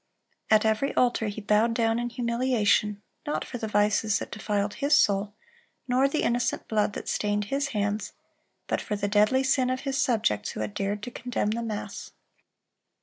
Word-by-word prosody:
(339) 215 - +6
At 220 0 +4
every 275 +6 -3
altar 240 -3 +2
he 205 +1 -5
bowed 215 +3 +2
down 225 0 +1
in 240 0 -2
humiliation, 235 -4 +1 0.2
not 295 - -1
for 245 - -6
the 220 - -3
vices 210 0 +2
that - - -6
defiled 205 -1 -1
his 285 +6 +3
soul, 200 +1 +2 0.5
nor 255 +2 +3
the 305 - -1
innocent 240 +1 0
blood 210 -2 +1
that - - -7
stained 205 0 0
his 280 0 +1
hands, 210 -4 -2 0.5
but - - -1
for 210 - -3
the 205 0 -2
deadly 210 +6 +3
sin 260 -1 +2
of 255 0 -1
his 275 -1 -2
subjects 215 - 0
who - - -5
had 105 -1 -4
dared 200 - -2
to 245 - -5
condemn 240 -4 -2
the 230 +2 -2
mass. 220 -3 -6
220 Hz, 185 wpm, -27 LUFS, 205-245 Hz, 0.5 s, 339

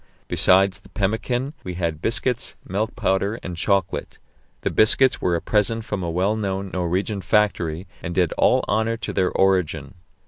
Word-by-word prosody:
Besides 95 +1 +3
the - - -19
pemmican, 120 +7 -1
we 90 -1 -5
had 85 -3 -2
biscuits, 120 +2 0
milk 105 +4 -2
powder, 100 -2 0
and 90 - -5
chocolate. 95 +1 -1 0.4
The - - -1
biscuits 130 +4 +4
were 90 - +1
a 85 - -2
present 110 +1 0
from 105 -4 -3
a 85 - -2
well 95 +6 +1
known 95 -2 -3
Norwegian 95 +3 -1
factory, 90 -5 +1 0.2
and 85 +1 -5
did 90 -4 +2
all - - +3
honour 110 +1 0
to - - -5
their 95 -2 +1
origin. 85 -7 +1
95 Hz, 165 wpm, -22 LUFS, 90-110 Hz, 0.4 s, biscuits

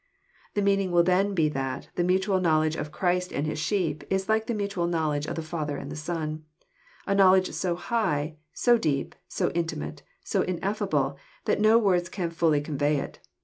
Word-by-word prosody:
The 205 - +1
meaning 195 -1 +2
will 175 -1 +4
then 190 +3 +2
be 160 -4 +3
that 135 -2 -4
the 175 - 0
mutual 190 +2 +2
knowledge 155 -2 +2
of 150 - -4
Christ 180 +1 0
and 145 - -1
His 155 0 -3
sheep 165 -1 -1
is 190 0 0
like 220 0 +1
the 235 - -1
mutual 200 -4 -1
knowledge 155 -3 0
of - - -3
the 165 - -3
Father 155 -2 -3
and - - -7
the - - -5
Son, 155 0 -4 0.3
— - - -29
a 200 - +1
knowledge 190 -1 +5
so 180 -2 -1
high, 160 -7 -1
so 240 -1 +3
deep, 145 -9 -1
so - - -1
intimate, 75 - -3 0.2
so - - 0
ineffinble, 175 -7 -1 0.3
that - - +1
no 215 +1 +6
words 180 -6 +2
can 175 -4 -3
fully 165 -3 +2
con 145 -1 -5
vey 145 +1 +2
it. - - -5
170 Hz, 195 wpm, -27 LUFS, 155-195 Hz, 0.3 s, no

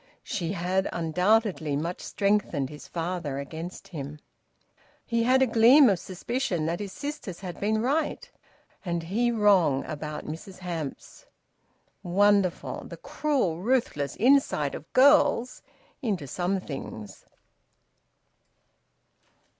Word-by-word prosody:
She 175 -2 -3
had 185 +1 0
undoubtedly 180 -1 +1
much 165 +5 -3
strengthened 195 -9 0
his 150 - -11
father 170 -4 -3
against 160 +5 -7
him. 145 -3 -6 0.9
He 235 -1 0
had 260 +3 +4
a - - +5
gleam 240 +2 +6
of 185 - 0
suspicion 185 -2 -2
that 170 +2 -1
his 205 -2 -5
sisters 285 - -6
had 180 -3 -7
been 215 +2 0
right, 310 - -1 0.6
and 170 -3 -2
he 220 +8 0
wrong, 200 - +3
about 150 0 -6
Mrs 180 +5 -8
Hamps. 165 -6 -6 0.7
Wonderful, 200 0 +1
the - - -9
cruel 260 - -1
ruthless 205 - 0
insight 240 - +3
of 155 - -9
girls 260 -2 +4 0.4
into 200 - -2
some 180 +7 -1
things! 135 - -8
185 Hz, 115 wpm, -27 LUFS, 160-225 Hz, 0.9 s, gleam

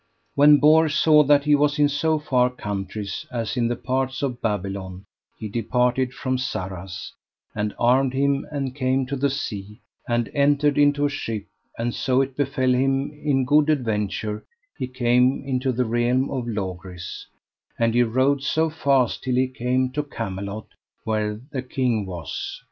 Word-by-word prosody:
When 145 +2 +7
Bors 155 +2 +4
saw 155 -1 +6
that 145 0 +4
he 150 0 +3
was 145 +1 +3
in 145 -1 +4
so 155 +2 +1
far 125 -5 +2
countries 100 -4 -5
as 115 -1 -3
in 120 -2 +1
the 120 - -1
parts 130 +2 -2
of 125 -3 -2
Babylon 95 -3 -3 0.3
he 110 - -5
departed 125 +3 0
from 130 -1 -2
Sarras, 95 -8 -5 0.4
and 105 -1 -2
armed 130 +2 +3
him 140 0 +1
and 135 -3 -3
came 130 -1 +1
to 140 +2 -3
the 140 +1 +1
sea, 105 -5 -5 0.3
and 120 -1 +1
entered 145 0 +2
into 145 0 +4
a - - +2
ship; 110 -7 -4 0.3
and 120 +1 -2
so 130 0 +1
it 135 -1 -1
befell 130 -2 +1
him 135 +2 +1
in 145 -3 0
good 150 +3 +4
adventure 105 -6 -1 0.3
he - - -4
came 125 +1 +2
into 130 -1 0
the 125 +1 0
realm 120 +3 +1
of 125 -3 -3
Logris; 95 -4 -6 0.5
and 115 -1 +1
he 120 - +4
rode 130 +4 +2
so 160 +3 +1
fast 135 -6 +1
till 130 -1 0
he 130 +1 +2
came 130 0 -1
to 150 - -1
Camelot 100 -6 -5 0.4
where 105 -1 -1
the 135 -3 -2
king 125 -5 -1
was. 90 -3 -6
130 Hz, 165 wpm, -23 LUFS, 110-140 Hz, 0.5 s, When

